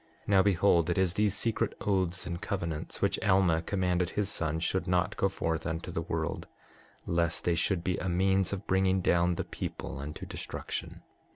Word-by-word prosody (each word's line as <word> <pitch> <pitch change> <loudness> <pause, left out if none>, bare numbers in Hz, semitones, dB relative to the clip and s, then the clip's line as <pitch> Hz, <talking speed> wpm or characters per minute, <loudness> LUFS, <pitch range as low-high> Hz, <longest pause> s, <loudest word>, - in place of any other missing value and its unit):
6:25 - - -30
Now 100 -2 +6
behold, 90 -3 +3
it 85 - 0
is 95 -2 +2
these 105 0 +1
secret 115 +2 0
oaths 95 -3 0
and 85 0 -4
covenants 85 -6 -3
which - - +2
Alma 95 -4 +3
commanded 90 -1 0
his 105 +1 -1
son 80 -3 -1
should 90 +2 -1
not 90 0 +1
go 95 - +2
forth 80 -4 -2
unto 80 +2 -3
the 80 - -2
world, 80 -1 -3 0.6
lest 85 -1 0
they 85 - +2
should 85 +1 0
be 90 +1 0
a 90 - -2
means 95 +1 +2
of 100 0 -4
bringing 95 0 +2
down 85 0 +3
the - - -2
people - - -6
unto 75 +2 -6
destruction. - - -6
90 Hz, 185 wpm, -30 LUFS, 85-95 Hz, 0.6 s, Now